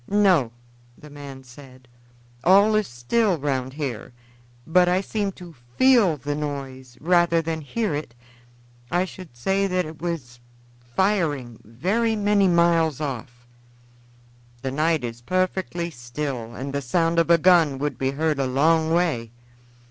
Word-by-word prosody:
"No," 185 - +3 0.5
the 150 - -14
man 140 -2 -10
said; 130 0 -15 0.6
"all 200 +4 +5
is 215 -2 +1
still 175 - 0
round 130 -3 -2
here, 130 -6 -5 0.5
but 180 +2 +4
I 180 +1 +2
seem 200 0 -2
to 175 -2 -12 0.2
feel 235 - +5
the 145 +2 -4
noise 135 -4 -6
rather 175 0 +3
than 160 0 -3
hear 210 +6 -2
it. 145 -5 -5 0.7
I 180 +1 +1
should 180 -9 -12
say 195 +10 +1
that 185 -2 0
it 155 0 -10
was 145 -9 -5 0.6
firing, 150 - 0
very 195 - -1
many 205 -1 +2
miles 170 -4 +3
off." 125 -4 -6 1.2
"The 135 - -2
night 155 +1 +1
is 120 -1 -6
perfectly 180 +2 -2
still, 120 -2 -5
and 135 +2 -6
the 140 - -1
sound 165 +6 +1
of 165 - +1
a 170 - +7
gun 165 -5 +4
would 145 -1 -3
be 130 - 0
heard 150 +1 -1
a 135 - +1
long 160 +5 +2
way." 165 -10 0
155 Hz, 145 wpm, -23 LUFS, 130-180 Hz, 1.2 s, a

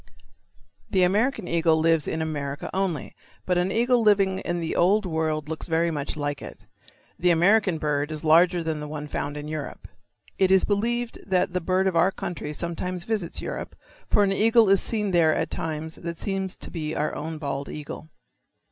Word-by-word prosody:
The 190 -3 +3
American 210 +3 +1
eagle 165 -1 +2
lives 165 -1 +2
in 160 - -1
America 145 -2 -4
only, 185 -7 -2 0.3
but 180 -1 +1
an 180 +2 0
eagle 240 +2 +3
living 195 -3 +3
in 175 0 -2
the 165 -1 -3
Old 200 +4 +3
World 160 -3 -1
looks 160 0 -5
very 165 0 +1
much 150 -1 -3
like 145 -1 -3
it. - - -10 0.5
The 180 - +3
American 185 +2 +4
bird 150 -1 -1
is 155 0 -4
larger 170 +2 +4
than 160 -2 -2
the 150 - -5
one 150 0 -6
found 145 0 -4
in 150 0 -6
Europe. 155 -1 -6 0.5
It 190 -1 +4
is 190 0 +5
believed 235 +3 -1
that 180 -2 +1
the 180 - 0
bird 185 +3 +1
of 190 -2 +1
our 175 +3 +5
country 170 -5 -5
sometimes 170 +3 -3
visits 210 -7 -2
Europe, - - -5 0.3
for 205 - +4
an 195 -1 +2
eagle 225 +1 +4
is 195 0 +5
seen 210 -3 -1
there 165 -3 +4
at - - -2
times 160 0 -4
that 170 -1 -6
seems 195 0 -3
to - - -8
be 155 -2 -4
our 150 +1 -1
own 160 +1 -5
bald 140 -2 -4
eagle. 150 +1 -8
170 Hz, 190 wpm, -25 LUFS, 155-190 Hz, 0.5 s, is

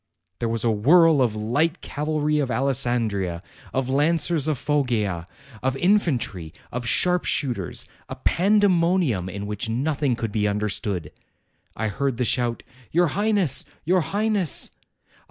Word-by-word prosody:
There 115 - -1
was 115 -1 0
a 115 - +3
whirl 155 +7 +5
of 115 -4 +1
light 145 +11 0
cavalry 150 0 -1
of 140 -3 -1
Alessandria, 120 -8 0 0.3
of 130 -1 -1
lancers 155 +2 +1
of 155 -3 0
Foggia, 115 - -1 0.3
of 130 +1 -1
infantry, 135 - 0 0.2
of 120 0 -4
sharp 180 +7 +2
shooters, 120 - -1 0.2
a - - -5
pandemonium 175 - +2
in 100 +2 -6
which 105 +2 -3
nothing 140 +2 0
could 115 -2 -4
be 105 0 0
understood. 100 -5 -2 0.6
I 110 0 -2
heard 135 +2 -2
the 125 - 0
shout, 120 -1 0 0.3
'Your 175 0 +3
Highness! 200 - +1 0.2
your 180 +3 +3
Highness!' 205 -1 0
130 Hz, 135 wpm, -24 LUFS, 110-165 Hz, 0.6 s, whirl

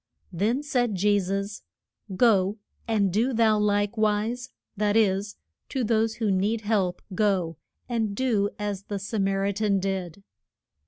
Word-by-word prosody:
Then 220 - 0
said 245 -6 0
Je 205 +2 +3
sus, 200 +2 -3 0.5
Go, 200 -2 +3 0.3
and 205 -5 +1
do 235 +6 +1
thou 220 -2 +3
like 205 +1 +1
wise; 220 +4 0 0.3
that 210 +1 +1
is, 200 -1 +1 0.3
to 265 - -1
those 225 0 +1
who 220 -4 0
need 205 +4 +1
help 205 -4 0
go 185 -5 +1 0.3
and 225 -4 -1
do 215 -5 +1
as 205 -1 -4
the 205 - -4
Sa 205 +3 -4
mar 195 0 +1
i 200 - +1
tan 200 -1 +1
did. 190 -1 -3
205 Hz, 150 wpm, -26 LUFS, 195-220 Hz, 0.5 s, Je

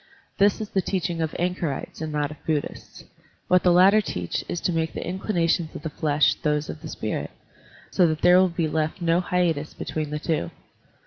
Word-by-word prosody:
This 200 +2 +4
is 215 -2 -5
the 190 - +1
teaching 175 -3 -2
of 160 -1 -2
anchorites 175 -5 -3
and 155 -1 -3
not 150 0 -1
of 150 - -12
Buddhists. 155 -3 -4 0.4
What 180 0 +4
the 180 - +4
latter 190 +5 +6
teach 90 - -3
is 175 - -2
to 180 - 0
make 160 -1 -1
the - - -5
inclinations 175 -3 0
of - - -7
the 160 - -4
flesh 150 -1 +2
those 150 0 0
of - - -11
the - - -7
spirit, - - -3 0.6
so 180 - +4
that 155 -1 -2
tiiere 180 +1 +7
will 185 0 +4
be 170 -1 -1
left 155 +2 -1
no 170 0 +2
hiatus 170 -5 0
between 155 -2 -4
the 150 - -3
two. 150 - -1
165 Hz, 200 wpm, -24 LUFS, 155-180 Hz, 0.6 s, tiiere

